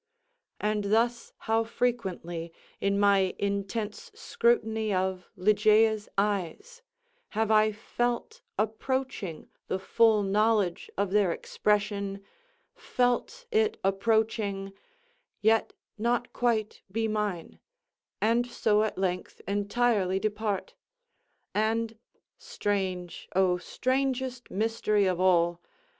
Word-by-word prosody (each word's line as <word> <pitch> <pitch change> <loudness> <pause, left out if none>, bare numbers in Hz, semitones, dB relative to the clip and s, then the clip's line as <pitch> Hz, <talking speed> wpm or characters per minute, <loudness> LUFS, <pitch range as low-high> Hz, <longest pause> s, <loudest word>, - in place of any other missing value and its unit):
And 210 -1 0
thus 230 +3 +1
how 225 0 +2
frequently, 190 -8 -2 0.3
in 200 0 +1
my 200 -2 +3
intense 200 - -3
scrutiny 225 - +1
of 185 -1 -1
Ligeia's 215 +2 +3
eyes, 210 - -2 0.6
have 220 0 +2
I 215 0 +5
felt 240 - -3 0.2
approaching 220 - -2 0.2
the - - -1
full 220 +2 +3
knowledge 205 -2 +1
of 200 -1 0
their 200 -3 +3
expression—felt 210 - -2
it 440 -1 +2
approaching—yet 220 - -1 0.3
not 240 +2 0
quite 225 -3 0
be 225 +2 0
mine—and 215 - -3
so 210 -3 +2
at 220 - -1
length 180 -1 -2
entirely 205 -1 +1
depart! 210 -1 -2 0.8
And 225 +1 0 0.4
(strange, 185 -4 -3
oh 185 -1 +3
strangest 255 +4 -1
mystery 215 -1 +1
of 185 -2 0
all!) 175 -2 +3
215 Hz, 90 wpm, -28 LUFS, 195-235 Hz, 0.8 s, I